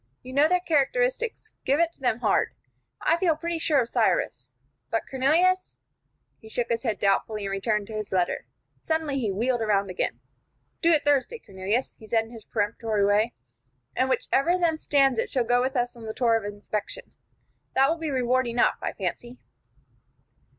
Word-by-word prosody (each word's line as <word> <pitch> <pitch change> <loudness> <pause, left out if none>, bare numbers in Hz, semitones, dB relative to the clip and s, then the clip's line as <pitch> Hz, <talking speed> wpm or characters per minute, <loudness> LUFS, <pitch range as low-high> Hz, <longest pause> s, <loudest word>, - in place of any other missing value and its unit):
You 255 - -9
know 285 +3 +5
their 360 +2 +3
characteristics; 450 - 0
give 280 +3 +2
it 335 0 +3
to - - -20
them 245 -2 0
hard. - - +1 0.5
I 330 - +3
feel 340 -3 +2
pretty 335 +1 -3
sure 300 -4 +3
of 235 - -3
Cyrus, 180 - 0 0.4
but 225 - 0
Cornelius 330 +8 +2 0.3
" - - -48
He 220 - -13
shook 240 +1 -2
his 230 -1 0
head 225 -5 -1
doubtfully, 205 +1 0
and 195 - -3
returned 210 +1 0
to 220 - -10
his 215 -1 -5
letter. 180 -2 0 0.3
Suddenly 315 -4 -1
he 220 -5 -1
wheeled 240 +5 0
about 200 -3 +1
again. 180 - -2 0.6
"Do 335 - +4
it 300 -3 +3
Thursday, 290 - +2
Cornelius," 205 - -3
he 220 - -13
said, 225 0 +1
in 225 - -15
his 225 -3 -11
peremptory 210 -1 0
way, 210 +4 +2 0.6
"and 260 +1 +1
whichever 270 +2 +1
one - - +3
of 365 - -3
them 325 -2 +2
stands 275 -5 +2
it - - -1
shall 255 -3 +1
go 245 +1 +2
with 260 +2 -1
us 245 -1 0
on 230 -2 -10
the 220 - -5
tour 235 -3 +3
of 225 -2 -1
inspection. 205 - -5 0.6
That 270 +1 +5
will 325 +3 0
be 320 -1 -3
reward 255 -1 +1
enough, 235 +1 +1
I - - -3
fancy." 245 +1 -5
245 Hz, 190 wpm, -26 LUFS, 220-300 Hz, 0.6 s, know